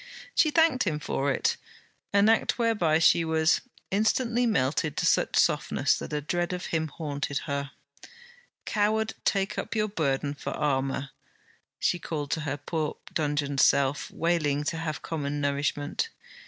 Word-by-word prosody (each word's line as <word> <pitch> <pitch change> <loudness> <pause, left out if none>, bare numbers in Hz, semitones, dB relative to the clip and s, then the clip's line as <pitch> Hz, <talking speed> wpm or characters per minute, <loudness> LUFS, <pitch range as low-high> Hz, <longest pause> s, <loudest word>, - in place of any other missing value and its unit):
She 310 - +4
thanked 310 -6 +3
him 160 -5 0
for 140 -2 -1
it; - - 0 0.5
an 200 +1 +4
act 225 0 +3
whereby 210 -10 +2
she 165 +1 +5
was: 160 0 +2 0.3
instantly 235 +4 +2
melted 145 - 0
to - - 0
such - - +2
softness - - +2
that - - -7
a 150 0 -1
dread 175 +4 -1
of 180 - -4
him 160 -1 +1
haunted 145 -2 -3
her. 140 -2 -2 1.0
Coward, 215 +1 +1
take 195 -1 0
up - - -4
your 215 -1 +1
burden 145 -6 -1
for 145 - -5
armour! 135 -1 -1 0.7
she 175 - +1
called 150 -4 -4
to 160 - 0
her 145 -2 -3
poor 155 +1 -3 0.2
dungeoned 145 -2 -1
self 140 +1 +3
wailing 155 -4 0
to 165 +3 -2
have 160 -2 -4
common 145 -2 -3
nourishment. 145 - -1
155 Hz, 150 wpm, -27 LUFS, 145-195 Hz, 1.0 s, she